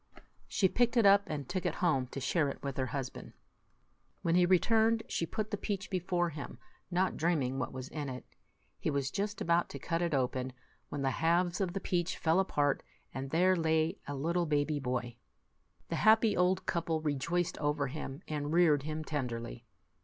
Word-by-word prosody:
She 190 Hz, -, +2 dB
picked 240 Hz, +5 st, +1 dB
it 230 Hz, -, +5 dB
up, 200 Hz, 0 st, +6 dB
and 145 Hz, -4 st, -4 dB
took 185 Hz, 0 st, -2 dB
it -, -, -1 dB
home 135 Hz, -8 st, +1 dB
to 140 Hz, -, -6 dB
share 145 Hz, +2 st, +1 dB
it -, -, -8 dB
with 140 Hz, -2 st, -3 dB
her 130 Hz, -1 st, 0 dB
husband. 135 Hz, -1 st, -5 dB, 0.9 s
When 165 Hz, -, +2 dB
he 175 Hz, 0 st, +5 dB
returned, 225 Hz, +5 st, +3 dB
she 165 Hz, -, -1 dB
put 215 Hz, +4 st, -3 dB
the 205 Hz, -, -1 dB
peach 200 Hz, 0 st, -4 dB
before 175 Hz, -1 st, 0 dB
him, 145 Hz, -1 st, -7 dB, 0.3 s
not 185 Hz, +1 st, +1 dB
dreaming 145 Hz, -6 st, 0 dB
what 130 Hz, -, -2 dB
was 130 Hz, 0 st, -6 dB
in 145 Hz, -2 st, -5 dB
it. 125 Hz, -1 st, -7 dB, 0.5 s
He -, -, -1 dB
was 140 Hz, -2 st, -1 dB
just 205 Hz, +1 st, -3 dB
about 170 Hz, +1 st, +2 dB
to -, -, -6 dB
cut 165 Hz, +5 st, -2 dB
it 170 Hz, -4 st, +1 dB
open, 130 Hz, 0 st, -1 dB, 0.4 s
when 145 Hz, -1 st, -3 dB
the 135 Hz, -, +2 dB
halves 175 Hz, +5 st, +1 dB
of 180 Hz, -3 st, -1 dB
the 195 Hz, -, -2 dB
peach 175 Hz, -2 st, -1 dB
fell 160 Hz, +3 st, +2 dB
apart, 145 Hz, -7 st, +1 dB, 0.3 s
and 135 Hz, 0 st, -4 dB
there 180 Hz, +5 st, +4 dB
lay 160 Hz, -1 st, +1 dB
a 145 Hz, -, -3 dB
little 170 Hz, +5 st, 0 dB
baby 145 Hz, 0 st, +1 dB
boy. 125 Hz, -3 st, -3 dB, 0.7 s
The -, -, -1 dB
happy 220 Hz, 0 st, +5 dB
old 180 Hz, +1 st, +2 dB
couple 165 Hz, -1 st, 0 dB
rejoiced 155 Hz, +4 st, -1 dB
over 145 Hz, -1 st, 0 dB
him, 140 Hz, +2 st, -6 dB
and 150 Hz, -1 st, -3 dB
reared 160 Hz, -4 st, +4 dB
him 155 Hz, +2 st, -4 dB
tenderly. 120 Hz, -5 st, -4 dB
160 Hz, 190 wpm, -32 LUFS, 140-180 Hz, 0.9 s, up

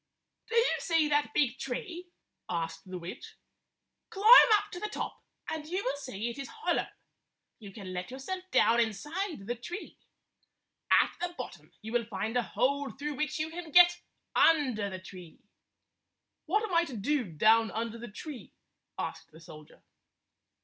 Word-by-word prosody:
"Do 460 Hz, -, -3 dB
you 465 Hz, +1 st, +4 dB
see 325 Hz, -3 st, +2 dB
that 290 Hz, 0 st, +2 dB
big 265 Hz, -3 st, +1 dB
tree?" 345 Hz, +7 st, -5 dB, 0.4 s
asked 165 Hz, 0 st, -4 dB
the 185 Hz, -, -5 dB
witch. 175 Hz, 0 st, -9 dB, 0.7 s
"Climb 440 Hz, +6 st, +8 dB
up 415 Hz, 0 st, -6 dB
to 355 Hz, -, -6 dB
the 425 Hz, -, -3 dB
top, -, -, -5 dB, 0.3 s
and 310 Hz, -1 st, -4 dB
you 370 Hz, +4 st, -2 dB
will 265 Hz, -, -1 dB
see 255 Hz, -6 st, -5 dB
it 235 Hz, +3 st, -5 dB
is 275 Hz, -, -5 dB
hollow. 445 Hz, +1 st, -1 dB, 0.7 s
You 205 Hz, -3 st, -10 dB
can 190 Hz, -2 st, -8 dB
let 180 Hz, 0 st, -4 dB
yourself 270 Hz, +9 st, -5 dB
down 230 Hz, -, +4 dB
inside 295 Hz, -, -2 dB
the 240 Hz, -, -1 dB
tree. 345 Hz, -, -8 dB, 0.9 s
At -, -, +5 dB
the 350 Hz, 0 st, -3 dB
bottom -, -, -8 dB
you 220 Hz, -, -6 dB
will 240 Hz, -1 st, +1 dB
find 225 Hz, +1 st, -3 dB
a 245 Hz, -, +4 dB
hole 280 Hz, +4 st, 0 dB
through 295 Hz, +2 st, -5 dB
which 300 Hz, +2 st, -2 dB
you 310 Hz, +1 st, -2 dB
can 340 Hz, 0 st, -7 dB
get 350 Hz, +2 st, +7 dB, 0.3 s
under 255 Hz, -11 st, +3 dB
the 190 Hz, -, -5 dB
tree." 185 Hz, -3 st, -12 dB, 1.1 s
"What 420 Hz, +7 st, +2 dB
am 420 Hz, -4 st, -4 dB
I 335 Hz, 0 st, +5 dB
to 260 Hz, -8 st, -7 dB
do 255 Hz, +5 st, 0 dB
down 220 Hz, +7 st, +4 dB
under 230 Hz, +1 st, -4 dB
the 240 Hz, 0 st, -8 dB
tree?" 260 Hz, +5 st, -9 dB, 0.4 s
asked -, -, -5 dB
the 160 Hz, -, -15 dB
soldier. 155 Hz, -2 st, -14 dB
265 Hz, 165 wpm, -30 LUFS, 215-335 Hz, 1.1 s, Climb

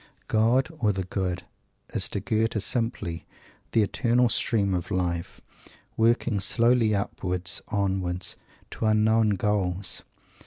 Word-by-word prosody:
"God," 120 Hz, +6 st, +3 dB
or 105 Hz, -5 st, +3 dB
"the 95 Hz, -1 st, -2 dB
Good," 90 Hz, -1 st, -3 dB, 0.5 s
is -, -, +1 dB
to -, -, -2 dB
Goethe 110 Hz, +1 st, 0 dB
simply 110 Hz, -9 st, -2 dB, 0.4 s
the 110 Hz, -, +4 dB
eternal 120 Hz, +3 st, +2 dB
stream 100 Hz, -4 st, +1 dB
of 90 Hz, -2 st, -2 dB
life, 90 Hz, -3 st, -2 dB, 0.5 s
working 115 Hz, -1 st, +2 dB
slowly 115 Hz, +2 st, +3 dB
upwards, 90 Hz, -3 st, -1 dB
onwards, 95 Hz, -3 st, -1 dB, 0.4 s
to 110 Hz, -, -2 dB
unknown 110 Hz, 0 st, +3 dB
goals. 95 Hz, -2 st, -1 dB
105 Hz, 115 wpm, -26 LUFS, 90-115 Hz, 0.5 s, the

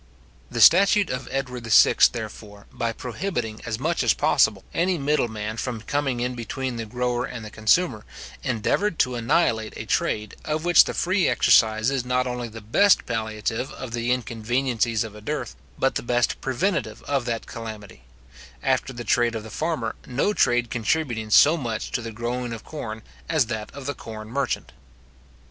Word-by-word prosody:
The 115 Hz, -, -2 dB
statute 195 Hz, -, +6 dB
of 130 Hz, +1 st, -4 dB
Edward 125 Hz, -3 st, -4 dB
VI. 110 Hz, -, +6 dB, 0.2 s
therefore, 105 Hz, +7 st, -8 dB
by 115 Hz, -, -2 dB
prohibiting 120 Hz, -, -4 dB
as 110 Hz, -1 st, -2 dB
much 160 Hz, +7 st, 0 dB
as 120 Hz, -3 st, +3 dB
possible -, -, +2 dB
any 180 Hz, +1 st, +1 dB
middle 145 Hz, -3 st, +1 dB
man 110 Hz, 0 st, -5 dB
from 115 Hz, -2 st, -3 dB
coming 135 Hz, -1 st, -1 dB
in 125 Hz, +1 st, -1 dB
between 125 Hz, +1 st, -4 dB
the 115 Hz, -1 st, -5 dB
grower 125 Hz, +1 st, -1 dB
and 125 Hz, -3 st, -6 dB
the 105 Hz, -, -9 dB
consumer, 110 Hz, +2 st, +2 dB, 0.4 s
endeavoured 160 Hz, -, 0 dB
to 125 Hz, -, +2 dB
annihilate 115 Hz, -2 st, +1 dB
a -, -, -6 dB
trade, 105 Hz, -1 st, -1 dB
of 155 Hz, +1 st, -2 dB
which 175 Hz, -2 st, +7 dB
the -, -, -4 dB
free 185 Hz, 0 st, +2 dB
exercise 110 Hz, 0 st, +4 dB
is 135 Hz, -3 st, -1 dB
not 125 Hz, 0 st, 0 dB
only 125 Hz, -1 st, -3 dB
the 115 Hz, 0 st, -10 dB
best 195 Hz, -, +4 dB
palliative 110 Hz, +2 st, -3 dB
of 130 Hz, -3 st, -7 dB
the 120 Hz, +1 st, -1 dB
inconveniencies 120 Hz, -1 st, 0 dB
of 110 Hz, -2 st, -8 dB
a 105 Hz, -, -12 dB
dearth, 150 Hz, +8 st, -4 dB, 0.2 s
but 135 Hz, -, +1 dB
the -, -, -2 dB
best 120 Hz, 0 st, 0 dB
preventive 130 Hz, -, -1 dB
of 140 Hz, -4 st, -1 dB
that 115 Hz, -2 st, -3 dB
calamity; 110 Hz, -, -8 dB, 0.6 s
after 135 Hz, -, 0 dB
the 120 Hz, 0 st, -6 dB
trade 120 Hz, -1 st, +2 dB
of 110 Hz, -, -4 dB
the 110 Hz, -, -10 dB
farmer, 155 Hz, -9 st, -2 dB
no 135 Hz, +12 st, 0 dB
trade 120 Hz, -, +2 dB
contributing 120 Hz, -1 st, -1 dB
so 150 Hz, +8 st, +7 dB
much 115 Hz, -7 st, -4 dB
to -, -, -1 dB
the 115 Hz, 0 st, -6 dB
growing 120 Hz, +2 st, -3 dB
of 115 Hz, -, -8 dB
corn 110 Hz, -8 st, -7 dB, 0.3 s
as 155 Hz, -6 st, +3 dB
that 110 Hz, -2 st, -4 dB
of 140 Hz, -1 st, -10 dB
the 145 Hz, -, -2 dB
corn 110 Hz, -3 st, -9 dB
merchant. 140 Hz, +3 st, -2 dB
120 Hz, 175 wpm, -24 LUFS, 110-135 Hz, 0.6 s, which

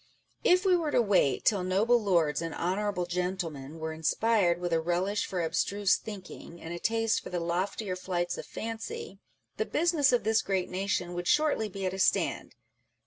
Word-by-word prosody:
If 365 Hz, +2 st, +4 dB
we 370 Hz, -2 st, +5 dB
were 330 Hz, -3 st, 0 dB
to 290 Hz, -, +2 dB
wait 190 Hz, -, +2 dB
till 200 Hz, -4 st, +3 dB
Noble 215 Hz, +6 st, +3 dB
Lords 170 Hz, -8 st, +2 dB
and 165 Hz, -1 st, -4 dB
Honourable 190 Hz, +1 st, -1 dB
Gentlemen 175 Hz, -5 st, -3 dB
were 160 Hz, 0 st, -4 dB
inspired 175 Hz, +2 st, +2 dB
with 175 Hz, -1 st, -2 dB
a 165 Hz, -, +2 dB
relish 180 Hz, +5 st, 0 dB
for 180 Hz, -3 st, -2 dB
abstruse 195 Hz, +4 st, +1 dB
thinking, 190 Hz, -4 st, -9 dB
and 165 Hz, +1 st, -7 dB
a 175 Hz, -, -5 dB
taste 225 Hz, +1 st, +1 dB
for -, -, -9 dB
the 180 Hz, -, -2 dB
loftier 185 Hz, +3 st, -2 dB
flights 175 Hz, -1 st, -2 dB
of -, -, -8 dB
fancy, 220 Hz, -3 st, -6 dB, 0.4 s
the -, -, 0 dB
business 320 Hz, -3 st, +2 dB
of 245 Hz, -, +2 dB
this 220 Hz, +1 st, +3 dB
great 190 Hz, -2 st, -2 dB
nation 185 Hz, -2 st, -1 dB
would 175 Hz, 0 st, -4 dB
shortly 295 Hz, -8 st, +2 dB
be 195 Hz, 0 st, -5 dB
at 185 Hz, -, -1 dB
a 190 Hz, -, -5 dB
stand. -, -, +1 dB
190 Hz, 185 wpm, -29 LUFS, 175-220 Hz, 0.4 s, we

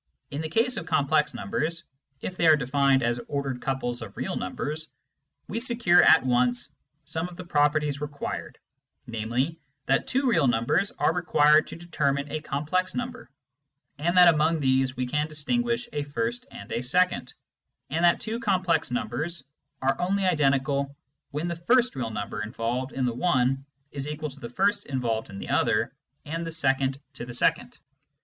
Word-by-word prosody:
In 145 Hz, -, -3 dB
the 160 Hz, -, -4 dB
case 230 Hz, +7 st, +2 dB
of 165 Hz, -, -5 dB
complex 150 Hz, -1 st, +2 dB
numbers, 160 Hz, +11 st, -2 dB, 0.4 s
if 185 Hz, -, -5 dB
they 170 Hz, -, +2 dB
are 155 Hz, -, +8 dB
defined 135 Hz, -1 st, +2 dB
as 120 Hz, 0 st, 0 dB
ordered 140 Hz, -3 st, -3 dB
couples 125 Hz, -3 st, -2 dB
of 110 Hz, -4 st, -9 dB
real -, -, -3 dB
numbers, 155 Hz, +2 st, -4 dB, 0.6 s
we -, -, -3 dB
secure 230 Hz, -8 st, +4 dB
at 160 Hz, -, +6 dB
once 125 Hz, -1 st, +1 dB, 0.3 s
some 160 Hz, +3 st, -3 dB
of 175 Hz, -, -12 dB
the 180 Hz, -, -7 dB
properties 150 Hz, -3 st, +1 dB
required, 145 Hz, -1 st, -5 dB, 0.5 s
namely, 120 Hz, +7 st, -2 dB, 0.3 s
that 135 Hz, -, +1 dB
two 270 Hz, +1 st, +1 dB
real 165 Hz, -, +3 dB
numbers 120 Hz, -, +2 dB
are 160 Hz, -, +2 dB
required 155 Hz, -3 st, +4 dB
to -, -, -8 dB
determine 145 Hz, -4 st, -1 dB
a 155 Hz, -, -2 dB
com 145 Hz, 0 st, -3 dB
plex 185 Hz, +4 st, 0 dB
number, 245 Hz, -, -5 dB, 0.7 s
and 175 Hz, +4 st, +1 dB
that 175 Hz, -2 st, +9 dB
among 160 Hz, +1 st, +2 dB
these 130 Hz, -2 st, +1 dB
we 125 Hz, -, 0 dB
can 150 Hz, +4 st, -1 dB
distinguish 235 Hz, +10 st, 0 dB
a 145 Hz, -, -1 dB
first 230 Hz, -, -3 dB
and -, -, -11 dB
a 120 Hz, -, -1 dB
second, 180 Hz, +9 st, +1 dB, 0.6 s
and 165 Hz, +4 st, 0 dB
that 170 Hz, -1 st, +5 dB
two 225 Hz, +1 st, -3 dB
complex 185 Hz, -8 st, +1 dB
numbers 125 Hz, +7 st, -3 dB, 0.4 s
are 135 Hz, +5 st, +1 dB
only 195 Hz, +2 st, +1 dB
identical 140 Hz, -4 st, +1 dB, 0.3 s
when 150 Hz, +4 st, -3 dB
the 170 Hz, -, -2 dB
first 240 Hz, +9 st, +2 dB
real 120 Hz, -4 st, -2 dB
number 105 Hz, -1 st, -4 dB
involved 120 Hz, +4 st, -3 dB
in 130 Hz, -1 st, -1 dB
the 120 Hz, -, 0 dB
one 135 Hz, -2 st, +1 dB, 0.3 s
is 140 Hz, 0 st, -4 dB
equal 150 Hz, 0 st, -4 dB
to 135 Hz, -, -13 dB
the 120 Hz, -, -7 dB
first 200 Hz, -, +1 dB
involved 120 Hz, -5 st, -2 dB
in 100 Hz, -, -8 dB
the -, -, -7 dB
other, -, -, +1 dB, 0.3 s
and 165 Hz, +3 st, -3 dB
the 165 Hz, -, -4 dB
second 135 Hz, -3 st, 0 dB
to 130 Hz, -, -7 dB
the 120 Hz, 0 st, -6 dB
second. -, -, +1 dB
150 Hz, 175 wpm, -26 LUFS, 130-175 Hz, 0.7 s, that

